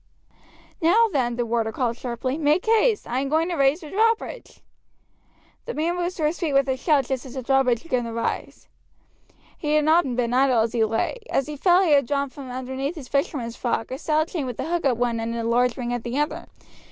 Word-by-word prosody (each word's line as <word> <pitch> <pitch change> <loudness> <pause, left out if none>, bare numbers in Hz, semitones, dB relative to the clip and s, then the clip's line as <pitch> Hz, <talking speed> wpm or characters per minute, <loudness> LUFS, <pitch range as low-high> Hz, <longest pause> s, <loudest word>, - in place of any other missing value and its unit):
"Now, 435 +8 +4
then," 240 -4 0
the 240 0 -1
warder 225 -1 0
called 235 0 -1
sharply, 250 +2 -3
"make 305 +3 +1
haste; 450 0 +3
I 245 +2 -1
am 275 0 -2
going 320 +3 +2
to 350 - -2
raise 275 +3 +2
the 305 - -10
drawbridge." 455 +4 -1 1.1
The 485 - -5
man 330 +3 0
rose 355 +1 -2
to 315 - -1
his 310 +3 -1
feet 320 -5 -1
with 275 0 +3
a 265 - +1
shout 280 0 +2
just 260 -1 -3
as 260 -1 -10
the 260 - -4
drawbridge 255 -2 +2
began 250 -7 -1
to 230 - -5
rise. 230 0 -4 0.9
He 300 -1 0
had 305 -1 +3
not 310 -5 +3
been 240 -1 0
idle 255 -2 +4
as 225 0 -1
he 230 -2 +2
lay. 225 - -1
As 270 - +1
he 300 - -6
fell 355 +5 +4
he 340 - +2
had 280 -4 +4
drawn 280 0 -1
from 270 -2 -9
underneath 260 +4 -4
his 285 -6 -9
fisherman's 275 -5 -1
frock 235 -2 -2
a 260 - -4
stout 310 +1 0
chain 300 -7 -3
with 245 - -6
a - - -2
hook 340 -2 -1
at 250 -4 +2
one 240 -1 0
end 230 +1 -3
and 230 -1 -3
a - - 0
large 245 +1 +2
ring 245 -1 -3
at 245 - -2
the 240 +2 -3
other. 295 +1 -2
270 Hz, 235 wpm, -24 LUFS, 245-315 Hz, 1.1 s, Now